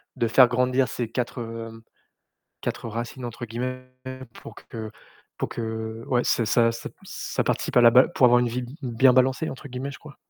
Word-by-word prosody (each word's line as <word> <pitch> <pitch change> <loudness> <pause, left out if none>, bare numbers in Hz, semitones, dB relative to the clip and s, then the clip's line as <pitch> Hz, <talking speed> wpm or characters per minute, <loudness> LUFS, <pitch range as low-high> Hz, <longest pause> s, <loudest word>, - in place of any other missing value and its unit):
de 115 - +1
faire 125 +2 +7
grandir 125 +1 +2
ces 120 -3 -4
4, 125 0 -3
hem, 115 0 -7 0.8
4 - - -4
«racines», 120 +3 -5
entre 120 0 -6
guillemets 130 +3 -5 0.5
pour - - -11
que 110 -1 -8 0.5
pour - - -2
que 110 0 -5
ouais, 125 -1 +2
ça 115 - +2
ça 115 +1 +3
ça 115 - -6 0.2
ça - - -3
participe - - -1
à - - +8
la 120 -1 +8
ba 125 +3 +7
pour 130 - +4
avoir 120 0 +5
une 125 - +1
vie 125 +2 -3
b - - -6 0.2
bien 125 +1 +4
«balancée» 130 +4 +2
entre 140 +2 -9
guillemets, 130 +3 -5
je - - -10
crois. 150 -2 -13
120 Hz, 200 wpm, -25 LUFS, 115-130 Hz, 0.8 s, à